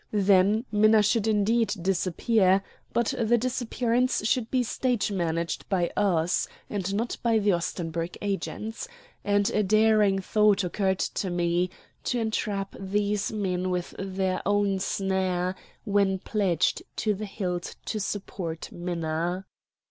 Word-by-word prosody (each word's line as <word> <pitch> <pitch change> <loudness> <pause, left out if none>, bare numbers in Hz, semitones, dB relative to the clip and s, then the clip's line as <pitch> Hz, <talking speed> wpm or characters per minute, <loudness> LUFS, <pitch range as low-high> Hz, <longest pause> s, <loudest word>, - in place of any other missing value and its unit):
Then 205 +2 +3
Minna 215 0 +5
should 220 +1 +2
indeed 220 +2 +2
disappear; 190 +2 +2 0.3
but 235 -1 +1
the 235 +1 +3
disappearance 245 -1 0
should 235 -1 +1
be 255 -1 +2
stage 245 -2 0
managed 170 -3 -2
by 180 -3 +1
us, 175 -4 +1 0.2
and 195 -2 -2
not 230 +3 -2
by 230 -2 +3
the 205 -1 +3
Ostenburg 170 -1 -3
agents; 215 - -4 0.4
and 205 0 +2
a 210 - +2
daring 215 -1 +4
thought 205 +1 +3
occurred 190 +1 0
to 190 - -2
me, 175 +1 +1 0.4
to 250 - 0
entrap 205 -3 -2
these 205 +1 -1
men 185 -4 -1
with 180 -1 -2
their 190 -1 -1
own 205 -1 +1
snare 185 -2 0 0.3
when 200 -3 +2
pledged 190 -3 0
to 215 -1 +1
the 210 +1 -5
hilt 180 -4 -4
to 215 - -2
support 185 -5 -4
Minna. 175 +1 -2
200 Hz, 130 wpm, -27 LUFS, 185-215 Hz, 0.4 s, Minna